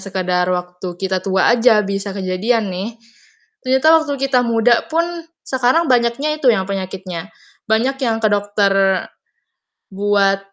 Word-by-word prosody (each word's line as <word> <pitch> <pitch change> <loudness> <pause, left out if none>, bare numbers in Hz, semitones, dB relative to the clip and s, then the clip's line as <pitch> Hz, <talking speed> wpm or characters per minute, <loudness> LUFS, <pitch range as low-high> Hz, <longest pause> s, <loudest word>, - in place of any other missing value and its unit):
sekedar 185 -2 -1
waktu 180 0 -4
kita 190 -1 -1
tua 190 +3 +2
aja 225 -2 +4
bisa 195 0 -4
kejadian 200 +4 -1
nih. 205 +6 -5 0.7
Ternyata 265 +4 +2
waktu 290 -2 -3
kita 255 -2 +3
muda 235 0 +2
pun, 335 0 -1 0.2
sekarang 260 +5 +1
banyaknya 245 +6 +1
itu 265 - +1
yang 190 -3 0
penyakitnya. 185 -1 -6 0.4
Banyak 245 +5 +1
yang 230 -4 0
ke 215 - +4
dokter 205 -1 +1 1.2
buat 195 0 +1
205 Hz, 130 wpm, -18 LUFS, 190-245 Hz, 1.2 s, aja